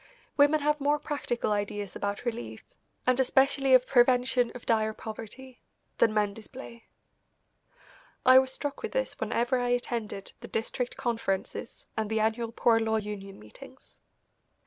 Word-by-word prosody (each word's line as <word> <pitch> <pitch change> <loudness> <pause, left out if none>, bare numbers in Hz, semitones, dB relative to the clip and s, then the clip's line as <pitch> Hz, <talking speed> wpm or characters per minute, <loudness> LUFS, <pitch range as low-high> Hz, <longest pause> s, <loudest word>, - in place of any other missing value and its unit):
Women 290 +1 +4
have 300 0 +1
more 290 +1 +2
practical 270 -7 -2
ideas 205 -1 -2
about 205 +4 -3
relief, 115 - -4 0.4
and 255 0 +3
especially 270 +1 +4
of 255 0 +4
prevention 250 -1 +3
of 250 - -9
dire 220 -1 +1
poverty, 230 +4 -9 0.4
than 225 - +5
men 210 -1 +1
display. 235 +2 -10 1.4
I 255 0 +9
was 260 0 -1
struck 285 +1 -5
with - - -5
this - - -2
whenever 245 +2 0
I 245 0 -1
attended 235 -5 -3
the - - -9
District 240 +2 -3
Conferences 230 -3 -3
and 220 -1 -2
the 220 0 0
annual 225 +1 0
Poor 230 -1 +3
Law 220 0 0
Union 205 -2 -6
Meetings. 105 0 -15
235 Hz, 145 wpm, -28 LUFS, 215-260 Hz, 1.4 s, I